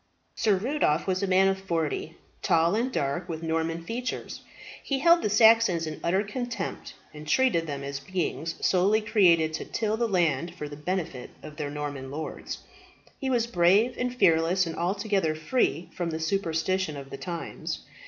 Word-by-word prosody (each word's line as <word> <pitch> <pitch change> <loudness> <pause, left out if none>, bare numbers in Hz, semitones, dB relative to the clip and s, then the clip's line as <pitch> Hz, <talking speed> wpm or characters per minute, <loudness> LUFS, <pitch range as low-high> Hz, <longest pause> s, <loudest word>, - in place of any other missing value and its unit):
Sir 210 -3 +2
Rudolph 205 - 0
was 185 0 0
a 200 - 0
man 190 +1 +4
of 195 0 +1
forty, 165 -3 -2 0.2
tall 170 -1 +3
and 240 +4 0
dark, 155 - -2
with 165 -1 -5
Norman 165 +1 -1
features. 240 +7 -4 0.4
He 275 - -1
held 335 +5 +5
the - - 0
Saxons 220 -5 +5
in 155 -1 -6
utter 190 +4 +2
contempt, 240 +3 -5 0.2
and 150 0 -10
treated 170 -3 +2
them 140 -2 -4
as 140 0 -4
beings 165 0 -3
solely 195 +4 +3
created 170 -7 +3
to - - -4
till 220 -1 -1
the 235 0 +1
land 170 -5 0
for 150 - -5
the 145 - -8
benefit 155 -4 -4
of 150 -1 -9
their 150 -2 -3
Norman 145 -2 -5
lords. 155 +3 -6 0.6
He 270 - -2
was 240 -3 +2
brave 200 +4 +3
and 250 0 -2
fearless, 170 -3 +3
and 165 -1 -5
altogether 195 -2 0
free 160 - 0
from 175 -2 -2
the 160 -1 -3
superstition 165 -1 -1
of 135 -1 -9
the 135 - -6
times. 170 0 -5
175 Hz, 175 wpm, -27 LUFS, 160-210 Hz, 0.6 s, held